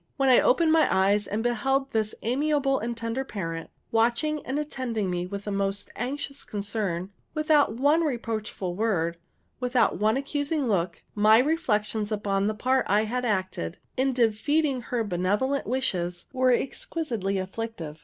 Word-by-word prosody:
When 270 Hz, -1 st, +3 dB
I 255 Hz, -, +7 dB
opened 320 Hz, +4 st, +4 dB
my 320 Hz, -1 st, +5 dB
eyes 200 Hz, +2 st, +3 dB
and 215 Hz, +2 st, -2 dB
beheld 270 Hz, +3 st, 0 dB
this 215 Hz, -1 st, 0 dB
amiable 275 Hz, +2 st, +1 dB
and 235 Hz, +1 st, -4 dB
tender 230 Hz, +3 st, -2 dB
parent 165 Hz, -9 st, -5 dB, 0.2 s
watching 240 Hz, +7 st, +1 dB
and 265 Hz, -, -1 dB
attending 245 Hz, -9 st, -2 dB
me 180 Hz, 0 st, -2 dB
with 200 Hz, +1 st, -6 dB
the 205 Hz, -, -4 dB
most 195 Hz, 0 st, -1 dB
anxious 275 Hz, +3 st, -4 dB
concern, 200 Hz, -3 st, -3 dB, 0.2 s
without 305 Hz, -1 st, +3 dB
one 290 Hz, +7 st, +3 dB
reproachful 225 Hz, -, -3 dB
word, 175 Hz, -6 st, 0 dB, 0.4 s
without 250 Hz, -1 st, +2 dB
one 215 Hz, +3 st, +3 dB
accusing 285 Hz, +1 st, -1 dB
look, 175 Hz, -5 st, -1 dB
my 215 Hz, +1 st, +6 dB
reflections 220 Hz, -7 st, 0 dB
upon 200 Hz, -1 st, 0 dB
the 215 Hz, -, -1 dB
part 255 Hz, +4 st, +1 dB
I 205 Hz, +2 st, +4 dB
had 250 Hz, +3 st, -2 dB
acted, 185 Hz, -, -2 dB, 0.2 s
in 265 Hz, +1 st, +2 dB
defeating 255 Hz, +4 st, +1 dB
her 235 Hz, 0 st, -2 dB
benevolent 205 Hz, +8 st, 0 dB
wishes, 180 Hz, -8 st, -1 dB
were 255 Hz, -1 st, +3 dB
exquisitely 240 Hz, -, -1 dB
afflictive. 190 Hz, -5 st, -5 dB
225 Hz, 150 wpm, -26 LUFS, 200-270 Hz, 0.4 s, I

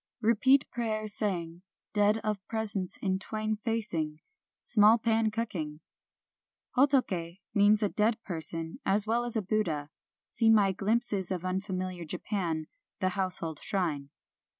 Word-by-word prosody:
" -, -, -58 dB
Repeat 260 Hz, +5 st, +4 dB
prayers 215 Hz, -3 st, -1 dB
saying, 175 Hz, -6 st, -2 dB, 0.3 s
dead 210 Hz, +1 st, +3 dB
of 210 Hz, -3 st, -2 dB
presence 210 Hz, -5 st, -2 dB
in 190 Hz, -1 st, 0 dB
twain 215 Hz, +1 st, -3 dB
facing, 170 Hz, -10 st, -2 dB, 0.2 s
— -, -, -64 dB
small 215 Hz, 0 st, +6 dB
pan 225 Hz, -1 st, +1 dB
cooking! 180 Hz, -10 st, -4 dB, 0.5 s
" -, -, -43 dB
Hotoke 245 Hz, -11 st, +2 dB, 0.2 s
means 205 Hz, +1 st, +4 dB
a 205 Hz, -, +2 dB
dead 215 Hz, +2 st, +1 dB
person 165 Hz, -2 st, -3 dB
as 200 Hz, +2 st, +2 dB
well 235 Hz, +2 st, 0 dB
as 240 Hz, -, -3 dB
a 220 Hz, -, 0 dB
Buddha. 170 Hz, -8 st, -1 dB, 0.4 s
(See 225 Hz, -2 st, +2 dB
my 205 Hz, -3 st, +5 dB
Glimpses 200 Hz, -1 st, 0 dB
of 185 Hz, -2 st, -3 dB
Unfa 190 Hz, +1 st, -2 dB
miliar 180 Hz, -2 st, -5 dB
Japan: 170 Hz, -7 st, -2 dB, 0.2 s
" -, -, -64 dB
The 185 Hz, -2 st, +1 dB
Household 180 Hz, -4 st, +3 dB
Shrine"). 155 Hz, -8 st, -2 dB
205 Hz, 150 wpm, -29 LUFS, 175-220 Hz, 0.5 s, small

